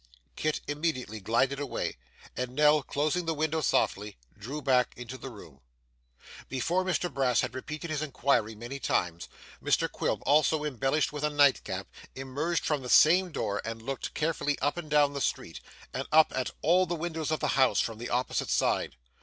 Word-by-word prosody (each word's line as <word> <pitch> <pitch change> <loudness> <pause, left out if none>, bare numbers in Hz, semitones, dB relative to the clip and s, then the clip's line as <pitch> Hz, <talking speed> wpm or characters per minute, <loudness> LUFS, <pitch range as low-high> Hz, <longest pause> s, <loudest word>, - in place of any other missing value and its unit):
Kit 155 0 -1
immediately 145 -7 -2
glided 115 +7 +1
away, 145 -2 -3 0.4
and 125 +1 -4
Nell, 150 +1 +5
closing 155 +5 -1
the 165 - 0
window 155 +1 0
softly, 105 -6 0 0.2
drew 130 +9 -6
back 130 -4 +2
into 125 +1 -7
the 135 - -8
room. 85 - -13 0.9
Before 165 +8 0
Mr 180 -2 -1
Brass 130 -3 +2
had - - -3
repeated 150 +5 -6
his 155 -1 -1
inquiry 135 -6 0
many 120 +5 -7
times, 85 -8 -1 0.3
Mr - - +2
Quilp, - - -2
also 150 +2 +3
embellished 135 +1 0
with 150 0 -5
a 150 - +2
night 145 -2 +4
cap, - - -5 0.3
emerged 140 +6 -2
from 150 -3 0
the 125 - -7
same 180 +6 +6
door 100 -9 -2
and 115 0 -5
looked 135 +1 -5
carefully 150 -2 0
up 145 +2 0
and 170 -3 -7
down 145 -1 +4
the 140 - -4
street, - - -3 0.3
and - - -4
up 155 0 +5
at 130 -1 -1
all 180 +3 +4
the 175 - -2
windows 160 -2 -3
of 155 - 0
the 150 - -1
house, 130 -1 +3
from 115 -1 -2
the 120 - -5
opposite 125 +1 -1
side. - - +1
145 Hz, 180 wpm, -29 LUFS, 125-155 Hz, 0.9 s, same